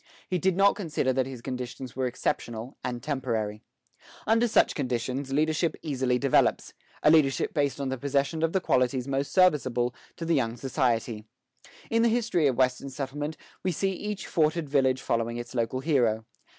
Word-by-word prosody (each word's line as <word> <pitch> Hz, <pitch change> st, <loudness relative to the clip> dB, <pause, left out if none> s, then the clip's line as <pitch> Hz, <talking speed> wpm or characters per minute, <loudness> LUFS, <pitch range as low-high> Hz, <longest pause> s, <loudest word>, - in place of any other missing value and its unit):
He 180 Hz, -, -1 dB
did 185 Hz, +1 st, +1 dB
not 200 Hz, +1 st, +5 dB
consider 160 Hz, -9 st, -1 dB
that 130 Hz, 0 st, 0 dB
his 130 Hz, -3 st, -8 dB
conditions 125 Hz, 0 st, -6 dB
were 130 Hz, 0 st, 0 dB
exceptional 120 Hz, 0 st, -3 dB
and 120 Hz, -1 st, -4 dB
temporary. 115 Hz, -7 st, -2 dB, 0.6 s
Under 225 Hz, +2 st, +3 dB
such 220 Hz, -, +3 dB
conditions, 130 Hz, 0 st, -2 dB
leadership 155 Hz, +3 st, +1 dB
easily 130 Hz, -4 st, 0 dB
develops, 135 Hz, 0 st, +2 dB, 0.3 s
a 150 Hz, -, +6 dB
leadership 150 Hz, -4 st, +3 dB
based 145 Hz, -3 st, 0 dB
on 140 Hz, -1 st, -2 dB
the 130 Hz, -1 st, -3 dB
possession 140 Hz, +4 st, 0 dB
of 165 Hz, 0 st, +2 dB
the 190 Hz, -, +1 dB
qualities 125 Hz, -3 st, +1 dB
most 140 Hz, +1 st, -1 dB
serviceable 130 Hz, -9 st, +3 dB, 0.2 s
to 165 Hz, -, -5 dB
the 165 Hz, -, +1 dB
young 115 Hz, -5 st, 0 dB
society. 120 Hz, -4 st, -1 dB, 0.7 s
In 230 Hz, 0 st, +3 dB
the 235 Hz, -, +4 dB
history 220 Hz, -9 st, +2 dB
of 130 Hz, -, +1 dB
Western 130 Hz, +1 st, +1 dB
settlement, 145 Hz, +3 st, -4 dB, 0.2 s
we 185 Hz, -, 0 dB
see 195 Hz, +4 st, 0 dB
each 205 Hz, +1 st, -5 dB
forted 155 Hz, 0 st, +1 dB
village 130 Hz, -2 st, +2 dB
following 115 Hz, 0 st, -1 dB
its 120 Hz, +1 st, -7 dB
local 120 Hz, +1 st, -1 dB
hero. 120 Hz, -8 st, +1 dB
135 Hz, 170 wpm, -27 LUFS, 125-160 Hz, 0.7 s, a